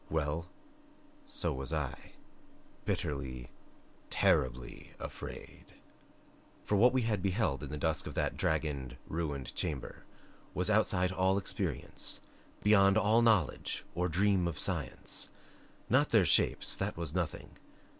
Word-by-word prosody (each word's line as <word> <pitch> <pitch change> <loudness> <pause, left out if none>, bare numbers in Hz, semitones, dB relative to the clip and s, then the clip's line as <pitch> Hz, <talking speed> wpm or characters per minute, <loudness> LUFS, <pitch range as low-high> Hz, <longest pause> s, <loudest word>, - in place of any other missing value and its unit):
Well 80 +2 -1 0.8
so 290 0 -1
was 65 +2 -4
I. 75 -5 -4 0.7
Bitterly, 65 -4 -3 0.6
TERRIBLY 60 -1 0
afraid. - - -8 1.0
For 105 - 0
what 120 +5 +6
we 130 -1 +1
had 105 -4 0
beheld 95 - 0
in 75 - -6
the 75 - -4
dusk 80 +1 0
of - - -7
that - - 0
dragoned, 70 -5 -1
ruined 75 -5 -3
chamber 70 -5 -3 0.5
was 90 +4 +1
outside 95 -4 +2
all 95 +1 +2
experience, 100 - -2 0.4
beyond 100 -1 +6
all 110 +2 +4
knowledge 110 - +2
or 90 +1 0
dream 95 +1 +2
of 80 -4 -3
science. - - -3 0.6
Not - - +3
their - - +5
shapes - - +4
that - - -2
was 85 -3 -3
nothing. 90 -3 -3
85 Hz, 125 wpm, -32 LUFS, 75-100 Hz, 1.0 s, what